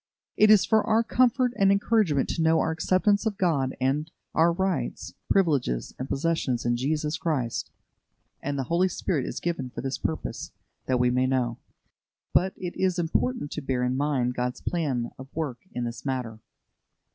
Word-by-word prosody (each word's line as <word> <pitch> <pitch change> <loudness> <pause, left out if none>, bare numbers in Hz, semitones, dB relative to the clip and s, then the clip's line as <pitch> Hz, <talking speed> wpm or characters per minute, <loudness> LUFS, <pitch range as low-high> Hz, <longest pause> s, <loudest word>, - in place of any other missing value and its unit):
It 215 - +5
is 210 -4 +7
for 220 -1 +3
our 225 +1 +3
comfort 250 +1 +2
and 195 0 +4
encouragement 200 -8 +2
to - - -1
know 160 0 +4
our - - +1
acceptance 190 +6 +2
of 205 -3 -2
God 145 -9 +1
and 140 +4 0 0.2
our 165 +1 +4
rights, 175 -8 -2 0.2
privileges, 145 - +1
and 130 - -4
possessions 140 -5 0
in 120 0 +2
Jesus 150 +5 -1
Christ, 135 -8 -1 0.7
and 140 +1 -3
the 135 - 0
Holy 170 +7 +2
Spirit 165 -6 -2
is - - -4
given 165 -7 -2
for 120 - -6
this 135 +1 -3
purpose, 160 - -4 0.3
that 130 -1 +2
we 125 0 +3
may 130 +1 +2
know. 125 -3 0 0.7
But 190 +1 +3
it 180 -2 -5
is 185 -1 +1
important 175 - -1
to 150 - -4
bear 130 -2 -1
in 125 +1 0
mind 135 -3 0
God's 125 0 -3
plan 135 -9 -1
of 130 - -8
work 150 -7 -3
in 125 - -3
this 120 0 -5
matter. 125 -5 -3
150 Hz, 175 wpm, -26 LUFS, 130-185 Hz, 0.7 s, is